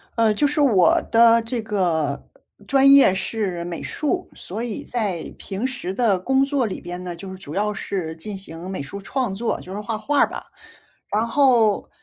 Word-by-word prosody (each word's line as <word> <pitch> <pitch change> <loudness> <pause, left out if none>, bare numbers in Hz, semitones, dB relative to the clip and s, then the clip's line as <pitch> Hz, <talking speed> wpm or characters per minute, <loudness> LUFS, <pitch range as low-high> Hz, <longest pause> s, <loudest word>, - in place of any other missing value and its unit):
呃， 225 -2 +3
就 250 +8 +1
是 295 +2 0
我 210 - +4
的 230 0 +6
这 230 0 -3
个 170 -9 -1 0.4
专 275 0 +5
业 275 -9 +7
是 190 -3 -2
美 175 -1 -5
术， 360 +4 -2
所 215 +6 -6
以 235 -4 -4
在 205 -9 -3
平 200 +4 -4
时 250 -8 -4
的 205 -3 +2
工 265 +8 +2
作 275 -2 0
里 205 - -5
边 180 +1 -6
呢， 175 -1 -5
就 190 +3 -9
是 190 - -8
主 150 -5 -9
要 210 +3 0
是 185 -5 -4
进 195 +5 -7
行 175 -1 -8
美 190 -5 -4
术 200 +8 -8
创 245 0 -2
作， 225 +4 -2
就 185 - -9
是 205 - -4
画 215 +1 -3
画 285 +6 0
儿 - - +4
吧。 - - -8 0.7
然 215 +2 +2
后， 235 -5 +3
210 Hz, 210 characters per minute, -22 LUFS, 185-245 Hz, 0.7 s, 业